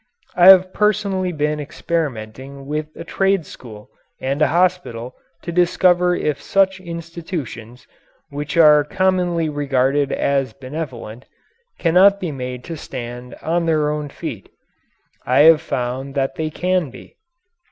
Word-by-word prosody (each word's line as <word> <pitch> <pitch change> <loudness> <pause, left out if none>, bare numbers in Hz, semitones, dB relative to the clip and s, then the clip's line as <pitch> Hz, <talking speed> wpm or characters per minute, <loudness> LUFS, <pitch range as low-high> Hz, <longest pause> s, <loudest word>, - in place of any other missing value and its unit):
I 175 0 +6
have 185 -1 +7
personally 200 -3 0
been 150 -1 -1
experimenting 140 -3 -4
with 150 +2 -3
a - - -8
trade 195 -3 0
school 105 -6 -12 0.3
and 135 +3 -2
a - - +5
hospital 170 -9 0 0.3
to 170 - -5
discover 180 0 +3
if 150 -4 -2
such 190 -1 +1
institutions, 165 - -7 0.5
which 145 +3 -5
are 150 -2 +7
commonly 180 0 0
regarded 140 -1 0
as 135 -4 0
benevolent, 130 -4 -7 0.5
cannot 190 +4 +4
be 175 -5 -3
made 125 -2 -6
to 165 +2 -7
stand 125 -2 -8
on 170 +1 0
their 155 -2 +1
own 150 -1 -4
feet. - - -7 0.7
I 130 +3 +3
have 160 0 +7
found 130 -1 -4
that 135 -1 0
they 155 +2 -3
can 180 -1 -1
be. - - -15
150 Hz, 130 wpm, -20 LUFS, 135-175 Hz, 0.7 s, have